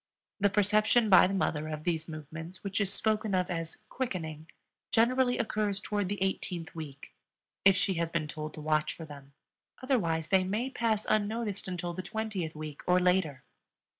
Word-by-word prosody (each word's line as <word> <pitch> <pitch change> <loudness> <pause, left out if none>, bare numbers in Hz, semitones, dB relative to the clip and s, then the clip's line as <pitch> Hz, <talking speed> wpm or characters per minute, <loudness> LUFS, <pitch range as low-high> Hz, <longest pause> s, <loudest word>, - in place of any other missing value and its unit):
The 205 0 +4
perception 210 +2 +3
by 185 -1 +9
the 195 - -2
mother 155 -5 0
of 155 -1 -5
these 160 -2 -1
movements, 160 +4 -8
which 200 +1 -1
is 195 -1 +1
spoken 215 -2 +1
of 180 -1 0
as 165 -1 -3
"quickening," 160 - -4 0.4
generally 245 +2 +3
occurs 215 -3 0
toward 205 -3 -2
the 205 - -2
eighteenth 180 -3 -3
week, 145 -4 -8 0.5
if 195 -1 +8
she 190 0 +2
has 165 - 0
been 165 -2 -1
told 155 0 -6
to 155 - -7
watch 155 0 +1
for 165 - -8
them; 140 -2 -12 0.5
otherwise 170 - 0
they 190 -1 +4
may 215 +8 -1
pass 225 -4 0
unnoticed 215 -1 0
until 175 -1 -3
the 185 - -4
twentieth 195 -5 -3
week 150 -1 -7
or 180 0 +5
later. 180 -7 +1
185 Hz, 170 wpm, -30 LUFS, 160-210 Hz, 0.5 s, by